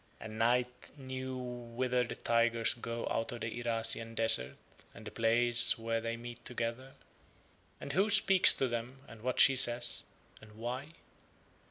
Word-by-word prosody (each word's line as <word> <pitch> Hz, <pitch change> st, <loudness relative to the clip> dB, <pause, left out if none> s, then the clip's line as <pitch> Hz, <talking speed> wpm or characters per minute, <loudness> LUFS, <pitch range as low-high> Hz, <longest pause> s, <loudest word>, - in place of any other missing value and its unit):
And 110 Hz, 0 st, -9 dB
Night 125 Hz, +2 st, -1 dB
knew 130 Hz, -1 st, -7 dB
whither 125 Hz, 0 st, -3 dB
the 115 Hz, -, -7 dB
tigers 115 Hz, -1 st, +1 dB
go 115 Hz, 0 st, -6 dB
out 115 Hz, -, -2 dB
of 120 Hz, -, -9 dB
the 115 Hz, +1 st, -5 dB
Irasian 115 Hz, 0 st, -1 dB
desert 115 Hz, -, +2 dB, 0.4 s
and 110 Hz, -, -13 dB
the 105 Hz, -, -8 dB
place 120 Hz, +2 st, +6 dB
where 115 Hz, 0 st, -3 dB
they 115 Hz, 0 st, -4 dB
meet 120 Hz, 0 st, -10 dB
together, 125 Hz, +2 st, -5 dB, 0.9 s
and 140 Hz, -, -7 dB
who 195 Hz, +4 st, +1 dB
speaks 195 Hz, -2 st, +5 dB
to 135 Hz, -, -1 dB
them 120 Hz, +3 st, -6 dB
and 115 Hz, -, -14 dB
what 125 Hz, +2 st, -3 dB
she 135 Hz, -, +6 dB
says 120 Hz, -1 st, +2 dB, 0.4 s
and 110 Hz, -1 st, -16 dB
why. 125 Hz, +7 st, -7 dB
120 Hz, 155 wpm, -31 LUFS, 115-125 Hz, 0.9 s, place